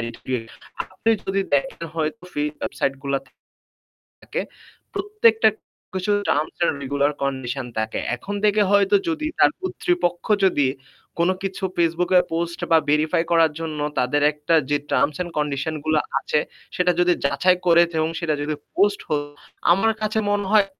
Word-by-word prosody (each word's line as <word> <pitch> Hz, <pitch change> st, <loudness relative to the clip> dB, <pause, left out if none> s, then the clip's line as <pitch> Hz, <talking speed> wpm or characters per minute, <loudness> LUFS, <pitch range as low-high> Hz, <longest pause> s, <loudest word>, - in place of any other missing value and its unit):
identification 115 Hz, 0 st, -5 dB, 0.3 s
আপনি 225 Hz, +4 st, 0 dB, 0.2 s
যদি 195 Hz, +1 st, 0 dB
দেখেন 140 Hz, +3 st, -1 dB
হয়তো 160 Hz, +8 st, -2 dB
free 150 Hz, 0 st, 0 dB
website 135 Hz, -, -1 dB
গুলাতে 140 Hz, -1 st, -3 dB, 0.9 s
থাকে -, -, -3 dB, 0.5 s
প্রত্যেকটা 425 Hz, +3 st, +3 dB, 0.4 s
কিছু 185 Hz, +2 st, -1 dB, 0.2 s
terms 150 Hz, +2 st, 0 dB
and -, -, +3 dB
regular 140 Hz, +1 st, +1 dB
condition 130 Hz, -1 st, -2 dB
থাকে। 110 Hz, 0 st, -1 dB, 0.2 s
এখন 200 Hz, +11 st, -6 dB
থেকে 210 Hz, 0 st, +4 dB
হয়তো 200 Hz, 0 st, +4 dB
যদি 315 Hz, -2 st, -2 dB
তার -, -, +6 dB
কর্তৃপক্ষ 355 Hz, -, -1 dB, 0.2 s
যদি 145 Hz, -8 st, +3 dB, 0.5 s
কোনো 175 Hz, +2 st, +3 dB
কিছু 195 Hz, 0 st, -4 dB
Facebook 170 Hz, +1 st, +1 dB
এ -, -, +9 dB
post 170 Hz, +1 st, -2 dB
বা 165 Hz, -, +7 dB
verify 155 Hz, +3 st, +2 dB
করার 165 Hz, -2 st, +5 dB
জন্য 160 Hz, -2 st, -4 dB, 0.2 s
তাদের 125 Hz, +4 st, +1 dB
একটা 150 Hz, +2 st, 0 dB
যে 145 Hz, -, +3 dB
terms 145 Hz, +1 st, +2 dB
and 175 Hz, -, -7 dB
condition 150 Hz, +1 st, -1 dB
গুলা 155 Hz, -1 st, +3 dB, 0.2 s
আছে 150 Hz, -, 0 dB, 0.4 s
সেটা 180 Hz, 0 st, +3 dB
যদি 175 Hz, 0 st, +4 dB
যাচাই 140 Hz, +7 st, +3 dB
করে 170 Hz, 0 st, +7 dB, 0.2 s
এবং 155 Hz, 0 st, +1 dB
সেটা 165 Hz, -3 st, 0 dB
যদি 150 Hz, +1 st, -2 dB, 0.2 s
post 200 Hz, +1 st, +3 dB
হয় 145 Hz, -1 st, 0 dB, 0.5 s
আমার 195 Hz, +6 st, +4 dB
কাছে 215 Hz, 0 st, 0 dB
মনে 205 Hz, -1 st, 0 dB
হয় 215 Hz, -2 st, +6 dB
165 Hz, 155 wpm, -22 LUFS, 145-195 Hz, 0.9 s, এ